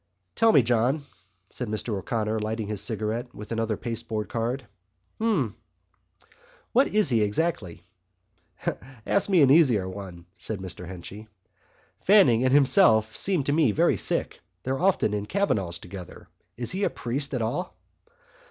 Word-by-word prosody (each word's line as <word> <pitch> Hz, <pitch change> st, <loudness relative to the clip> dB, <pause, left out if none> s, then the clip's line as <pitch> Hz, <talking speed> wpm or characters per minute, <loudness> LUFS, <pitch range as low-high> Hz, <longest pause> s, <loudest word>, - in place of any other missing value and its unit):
"Tell 225 Hz, 0 st, +4 dB
me, 140 Hz, -, +5 dB
John," 125 Hz, +5 st, +1 dB, 0.5 s
said 125 Hz, -, -4 dB
Mr 110 Hz, +2 st, -3 dB
O'Connor, 110 Hz, +2 st, -2 dB
lighting 110 Hz, 0 st, -3 dB
his 105 Hz, -2 st, -2 dB
cigarette 115 Hz, +3 st, -3 dB
with 105 Hz, +2 st, -10 dB
another 115 Hz, -2 st, -1 dB
pasteboard 110 Hz, -2 st, -4 dB
card. 120 Hz, +3 st, -2 dB, 0.5 s
"Hm?" 180 Hz, -, 0 dB, 1.2 s
"What 265 Hz, +3 st, +4 dB
he 210 Hz, -, -3 dB
is 210 Hz, -10 st, +3 dB
exactly?" 105 Hz, -, -1 dB, 1.2 s
"Ask 200 Hz, -, +2 dB
me 180 Hz, -6 st, +5 dB
an 135 Hz, -, +5 dB
easier 125 Hz, -, +4 dB
one," 95 Hz, -3 st, -8 dB
said 110 Hz, -, -4 dB
Mr 90 Hz, -2 st, -6 dB
Henchy. 95 Hz, +4 st, -9 dB, 0.8 s
"Fanning 160 Hz, -, +5 dB
and 130 Hz, -, +2 dB
himself 130 Hz, -, +4 dB
seem 185 Hz, -7 st, +1 dB
to 145 Hz, -, 0 dB
me 150 Hz, -7 st, +3 dB
very 100 Hz, -, +2 dB
thick. -, -, -3 dB, 0.2 s
They're 135 Hz, +1 st, -2 dB
often 185 Hz, -, +2 dB
in 105 Hz, 0 st, -3 dB
Kavanagh's 100 Hz, -, 0 dB
together. 90 Hz, +1 st, -10 dB, 0.3 s
Is 120 Hz, -1 st, -2 dB
he 190 Hz, +2 st, -2 dB
a -, -, +2 dB
priest 135 Hz, +4 st, -2 dB
at 120 Hz, -, -1 dB
all?" 175 Hz, +11 st, -3 dB
115 Hz, 145 wpm, -26 LUFS, 105-145 Hz, 1.2 s, me